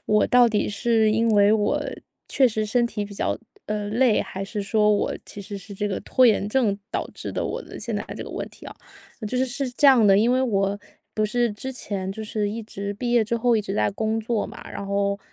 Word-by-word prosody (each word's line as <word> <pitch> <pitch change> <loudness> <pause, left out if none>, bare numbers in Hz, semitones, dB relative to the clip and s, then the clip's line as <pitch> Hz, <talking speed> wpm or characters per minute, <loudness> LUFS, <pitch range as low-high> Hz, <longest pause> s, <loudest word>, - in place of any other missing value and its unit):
我 210 0 +3
到 245 -1 +5
底 215 -2 0
是 220 +1 +2
因 230 +1 +2
为 205 0 +5
我 210 -1 +2 0.5
确 265 -2 +4
实 215 -1 -1
身 235 +3 +2
体 210 -3 -4
比 200 - -10
较， - - -1 0.3
呃， 210 -1 -2
累， 235 0 +3
还 195 - -6
是 200 +1 -4
说 210 +1 +2
我 205 - +1
其 205 - -7
实 200 0 -7
是 200 +2 -10
这 205 +2 -2
个 195 - -3
拖 255 - +4
延 210 -3 +2
症 210 -4 +1
导 - - -2
致 - - -6
的， - - -2
我 - - -3
的 - - -10
现 - - -4
在 - - -1
的 - - -8
这 - - -6
个 - - -8
问 - - -5
题 - - -15
啊。 - - -9 0.5
就 255 - -2
是 260 - +2
是 270 +1 -2
这 275 +4 +3
样 255 -6 +7
的 195 -1 +6
因 225 +4 +3
为 255 - +2
我 200 -5 0 0.3
不 215 0 0
是 240 +1 +1
之 235 +6 -6
前 200 -7 -4
就 220 +2 -6
是 210 -1 -1
一 225 +3 -4
直 200 -1 -5
毕 240 +3 -2
业 240 -2 +5
之 225 +2 -1
后 240 +1 +2
一 220 - +2
直 195 -1 -4
在 - - +1
工 220 +2 -1
作 225 -1 -1
嘛， - - -11
然 200 - -6
后 200 0 0
215 Hz, 270 characters per minute, -24 LUFS, 205-235 Hz, 0.5 s, 样